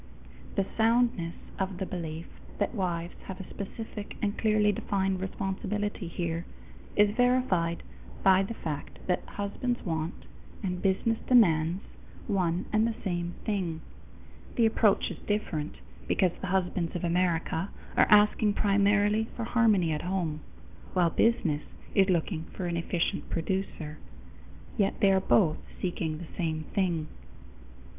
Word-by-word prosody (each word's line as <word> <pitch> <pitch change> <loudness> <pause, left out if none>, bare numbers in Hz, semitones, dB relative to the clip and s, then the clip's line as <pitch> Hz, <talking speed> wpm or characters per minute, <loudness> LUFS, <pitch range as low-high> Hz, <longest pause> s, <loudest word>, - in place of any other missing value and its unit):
The 195 - +2
soundness 230 -6 +2 0.2
of 190 -1 -1
the 190 - -2
belief 165 -2 -5 0.3
that 205 - 0
wives 175 -5 -2
have 190 -1 -7
a 190 - -7
specific 210 +1 -7
and 205 0 0
clearly 215 -1 +3
defined 195 -1 0
responsibility 195 +1 -2
here 170 -1 -2 0.5
is 210 0 +4
verified 245 -10 +2 0.4
by 190 0 +6
the 200 +4 -3
fact 150 -7 -5
that 180 - +1
husbands 240 +5 -3
want, 160 0 -3 0.4
and 180 -2 -2
business 205 +4 +1
demands, 175 -7 +4 0.4
one 180 -3 0
and 215 +1 +4
the 230 - -2
same 175 -2 -2
thing. 180 -7 -1 0.7
The 235 - +4
approach 220 -2 +3
is - - -7
different, 170 -8 -1 0.3
because 185 -2 +3
the 195 - -3
husbands 180 -2 0
of 175 - -3
America 170 0 +1 0.3
are - - +5
asking 210 0 +5
primarily 205 +2 +3
for 235 - -3
harmony 220 -8 +3
at 150 - -1
home, 175 -4 -1 0.5
while 175 -3 +3
business 175 -10 +2 0.3
is 195 -1 +4
looking 170 -2 0
for 185 - -3
an 170 -1 -1
efficient 170 0 -1
producer; 165 -3 -3 0.8
yet 200 -2 +1
they 195 -1 +5
both 185 -3 +3
are - - -17
seeking 165 -3 -2
the 170 0 -10
same 160 -2 -1
thing. 175 -5 +1
190 Hz, 135 wpm, -29 LUFS, 170-210 Hz, 0.8 s, by